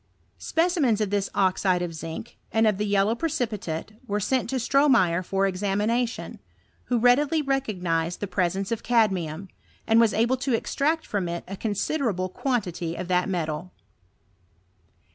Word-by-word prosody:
Specimens 325 - +1
of 210 -2 -1
this 200 -1 0
oxide 185 -1 +2
of 170 -1 -4
zinc, 165 +7 -7
and 225 0 +3
of 210 -2 +2
the 210 - 0
yellow 200 +2 +2
precipitate, 215 - -3 0.2
were 205 -1 0
sent 250 +3 0
to 265 - -2
Stromeyer 245 - +3
for 195 +2 0
examination, 205 +5 -1 0.5
who 245 - +1
readily 280 +6 +3
recognised 180 - -1
the - - -2
presence 190 +1 -1
of 230 -1 -1
cadmium, 195 -7 +1 0.4
and 225 0 +4
was 230 -2 +4
able 235 +4 +2
to 255 -1 0
extract 310 +7 0
from 195 -4 -2
it 170 0 -4
a 195 - -5
considerable 205 - -1
quan 245 +3 -1
tity 170 -2 -5
of 180 - -5
that 180 +1 +2
metal. 170 -1 -3
205 Hz, 150 wpm, -25 LUFS, 180-245 Hz, 0.5 s, and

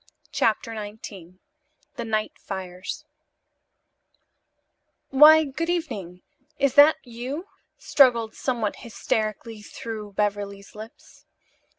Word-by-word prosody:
CHAPTER 230 -5 0
XIX 205 -4 -9 0.6
THE 235 - -5
NIGHT 215 -1 -1
FIRES 185 -1 -6 2.1
"Why, 305 +3 +8
good 310 +4 -4
evening. 200 - -4 0.3
Is 280 -2 +2
that 290 +3 +8
you?" 255 +7 -6 0.3
struggled 235 -5 +3
somewhat 235 -5 -2
hysterically 220 0 -3
through 210 -1 -8
Beverly's 200 -1 -3
lips. 215 +2 -13
225 Hz, 85 wpm, -25 LUFS, 205-270 Hz, 2.1 s, Why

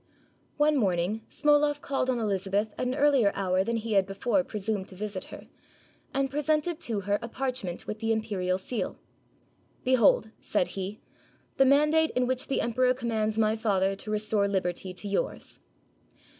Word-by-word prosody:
One 300 0 +3
morning 190 -1 0
Smoloff 295 0 +3
called 270 -2 -1
on 255 - +1
Elizabeth 205 -1 -1
at 250 - -2
an 255 - -1
earlier 275 -8 +4
hour 185 -1 +1
than 230 +2 -1
he 225 0 -3
had 195 -1 +3
before 235 +8 0
presumed 210 -4 -3
to 185 - -12
visit 205 -1 -5
her, - - -11 0.7
and 275 0 +1
pre 290 - -1
sented 310 +2 0
to 230 -10 -2
her 205 +1 0
a 230 - -6
parchment 250 -9 -4
with 215 - -5
the 225 0 0
imperial 200 -5 0
seal. 215 +5 -4 0.9
"Be 260 - +2
hold," 220 -2 +4
said 195 -4 0
he, 195 +2 -5 0.6
"the 270 - +6
mandate 300 +4 +4
in 250 0 +2
which 255 0 -1
the 275 - 0
emperor 250 +2 +2
commands 220 -3 -1
my 220 0 +3
father 195 -3 +1
to 215 - -8
restore 210 -1 +1
liberty 185 -1 -2
to 185 +3 -8
yours." 200 - -3
220 Hz, 170 wpm, -28 LUFS, 200-260 Hz, 0.9 s, the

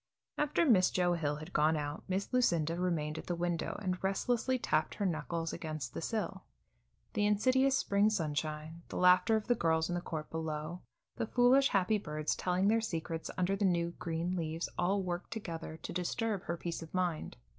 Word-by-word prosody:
After 300 +3 +2
Miss 205 - +5
Joe 180 -1 +2
Hill 150 -4 0
had 155 +4 -9
gone 155 +1 +3
out, 145 0 -4
Miss 190 +5 -2
Lucinda 170 -10 +2
remained 160 -4 -1
at - - -10
the 175 - -1
window 175 -1 -2
and 185 -1 -2
restlessly 240 +6 +1
tapped 155 -10 0
her 205 - -1
knuckles 165 -1 -2
against 155 -6 -5
the - - -4
sill. 220 +5 -2 0.7
The 205 0 +2
insidious 260 +6 +3
spring 200 -3 +3
sunshine, 155 -3 -2
the - - -5
laughter 180 +5 +5
of 220 - -1
the 245 - +3
girls 160 -6 +1
in - - -1
the 175 - -1
court 155 -3 -5
below, 160 +1 -4 0.4
the 230 - -1
foolish 250 +4 +5
happy 200 0 +2
birds 155 -4 -2
telling 185 +2 +1
their 225 +2 +4
secrets 165 -5 -3
under 185 +2 +1
the 200 - -2
new, 170 -3 +2
green 170 +2 -2
leaves, 165 -1 -2
all 195 +3 +1
worked 175 0 -3
together 165 -7 -5
to - - -5
disturb 195 +3 -1
her 170 - -2
peace 170 0 -4
of 165 +2 -9
mind. 175 -4 -1
175 Hz, 190 wpm, -33 LUFS, 160-205 Hz, 0.7 s, Miss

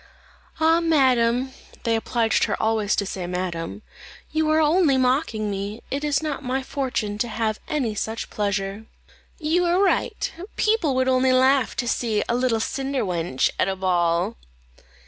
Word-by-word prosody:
"Ah, 325 +1 +4
madam" 260 -6 +2 0.3
(they 230 -2 +1
obliged 225 0 +1
her - - -2
always 220 -2 +1
to 200 - -1
say 185 -2 -4
madam), 180 +2 -4 0.5
"you 315 0 +1
are 310 0 +4
only 310 -2 +3
mocking 250 -5 +1
me; 200 +3 -5
it 280 +2 -2
is 295 +1 +1
not 295 -2 -3
my 260 +1 -1
fortune 235 -7 -3
to 240 - 0
have 220 -1 -2
any 265 -8 -1
such 220 +2 -4
pleasure." 200 +1 -2 0.5
"You 330 +3 +1
are 345 +1 +2
right; 400 +3 +1 0.2
people 425 - +1
would 260 0 +1
only 260 0 +3
laugh 260 0 +3
to 245 - -2
see 225 -3 0
a - - 0
little 245 -2 +1
cinder 270 +2 -2
wench 170 -7 0
at - - +3
a 190 - -1
ball." 175 - +1
240 Hz, 160 wpm, -23 LUFS, 210-280 Hz, 0.5 s, Ah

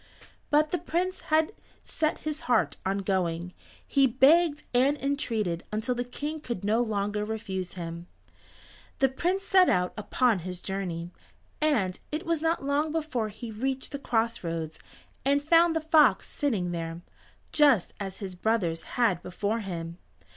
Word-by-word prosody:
But 300 +1 +3
the 355 - 0
Prince 355 +3 -1
had 315 +5 +3 0.3
set 310 -1 -1
his 305 0 -3
heart 245 - +3
on 195 +1 -1
going. 180 -2 -1 0.3
He 275 -1 +4
begged 295 +5 +4
and 265 +4 +3
entreated 225 - -1
until 220 +4 0
the 245 0 -2
King 295 +5 -5
could 235 -9 -5
no 215 +3 +2
longer 210 -2 -1
refuse 210 -4 -4
him. 170 -1 -6 0.9
The 270 - +3
Prince 360 +9 -1
set 375 -2 +5
out 180 0 +1
upon 220 0 +1
his 180 +1 -6
journey, 175 -3 -4 0.5
and 220 -12 +1
it 305 +2 -3
was 330 -2 0
not 325 -3 0
long 290 +2 +1
before 295 -9 -1
he 220 +2 -8
reached 260 +4 -3
the 280 - -4
cross 230 -4 0
roads, 165 -2 -4 0.4
and 280 +1 +3
found 330 +3 +4
the 320 - +1
fox 315 -1 +4
sitting 210 - -1
there, 165 0 -4 0.5
just 280 - +4
as 195 -2 -5
his 195 -3 -6
brothers 180 -4 0 0.2
had 225 -8 +3
before 205 +5 -2
him. 170 -4 -5
230 Hz, 155 wpm, -28 LUFS, 185-295 Hz, 0.9 s, set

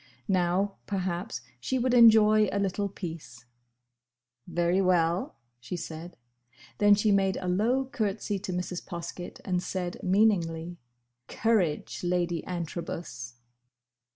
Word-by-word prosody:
Now, 185 +2 +1
perhaps, 180 - -3 0.2
she 260 - -1
would 250 0 +1
enjoy 215 -3 +7
a - - -1
little 200 0 -1
peace. 160 -11 -8 1.0
"Very 175 +2 +1
well," 175 -1 +1 0.2
she 125 +9 -6
said. 165 +1 -7 0.6
Then 205 0 +6
she 210 +1 +2
made 195 -1 +2
a 185 - -4
low 230 +9 +2
curtsey 210 -4 -2
to 190 -1 -5
Mrs. 180 0 -3
Poskett, 170 +1 -7
and 180 -2 0
said, 180 -1 -4
meaningly, 175 -4 +1 0.5
"Courage—Lady 175 -4 0
Antrobus!" 165 -8 -5
180 Hz, 110 wpm, -28 LUFS, 170-205 Hz, 1.0 s, enjoy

